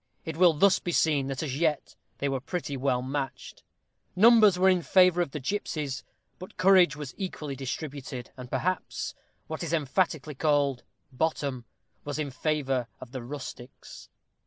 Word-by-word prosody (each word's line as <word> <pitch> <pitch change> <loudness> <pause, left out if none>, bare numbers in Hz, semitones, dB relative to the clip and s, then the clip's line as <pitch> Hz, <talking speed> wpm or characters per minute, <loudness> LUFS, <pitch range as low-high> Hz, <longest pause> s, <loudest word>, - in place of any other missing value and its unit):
It 160 - -4
will 175 0 +5
thus 190 +5 +4
be 175 - -3
seen 150 -5 +2
that 135 +2 -3
as 140 -2 -3
yet 155 -3 0 0.2
they 140 - -1
were 135 -1 -1
pretty 145 +1 -4
well 130 -2 0
matched. 135 0 -5 0.5
Numbers 215 -1 +7
were 185 +1 +4
in 185 -2 +4
favor 180 +3 +4
of 175 - -1
the 150 - -5
gipsies, 145 -4 -3 0.4
but 185 - -11
courage 185 -3 +5
was 145 -4 -7
equally 155 -7 -4
distributed, 135 -1 -6
and, 125 -1 -9
perhaps, 185 +6 -2 0.3
what 160 - -6
is 170 -1 -3
emphatically 155 -1 0
called 145 -3 +1 0.3
"bottom," 135 -3 -2 0.4
was 145 0 -4
in 150 -3 -3
favor 135 -4 -1
of 125 - -11
the 130 -1 -5
rustics. 130 -1 -9
150 Hz, 160 wpm, -28 LUFS, 135-175 Hz, 0.5 s, Numbers